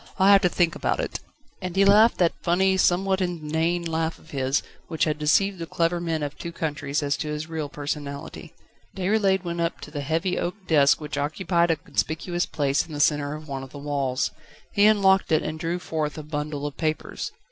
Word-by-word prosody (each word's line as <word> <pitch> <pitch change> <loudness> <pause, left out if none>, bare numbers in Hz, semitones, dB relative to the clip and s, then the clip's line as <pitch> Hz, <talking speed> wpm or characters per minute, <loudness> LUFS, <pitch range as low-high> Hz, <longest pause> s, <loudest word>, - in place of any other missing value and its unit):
I'll 190 0 +5
have 200 -1 +7
to 180 - +3
think 170 -2 +2
about - - -1
it!" - - -3 0.4
And 180 -1 -4
he 195 +1 +5
laughed 210 +3 +6
that 175 -2 +3
funny, 190 +2 +2
somewhat 190 +1 +2
inane 170 0 -1
laugh 165 0 -1
of 160 - -18
his, 135 0 0 0.2
which 160 -2 -1
had 155 -1 0
deceived 185 +5 +2
the 165 - -5
clever 170 +1 0
men 165 -3 -1
of 145 0 -4
two 170 - -5
countries 150 -2 -2
as 140 0 +1
to 155 - -4
his 150 +1 -4
real 160 -3 -4
personality. 145 -1 -6 0.5
Déroulède 190 0 +2
went 170 -1 -3
up 170 0 -1
to 150 - -9
the 145 -1 -4
heavy 165 +6 -1
oak 175 - -2
desk 145 -5 +4
which 150 -2 -4
occupied 170 +4 +1
a 165 - +3
conspicuous 165 +3 -2
place 140 -1 +1
in 160 - -11
the 145 - -4
centre 145 0 +2
of 155 0 -10
one 135 -2 -4
of 135 - -9
the 145 - -10
walls. 140 -3 -1 0.4
He 205 0 +5
unlocked 195 -4 +4
it 155 - +3
and 155 0 -4
drew 170 +2 -1
forth 160 -3 -3
a 155 - -6
bundle 150 -1 -4
of 145 - -5
papers. 155 -1 -3
160 Hz, 210 wpm, -25 LUFS, 150-180 Hz, 0.5 s, have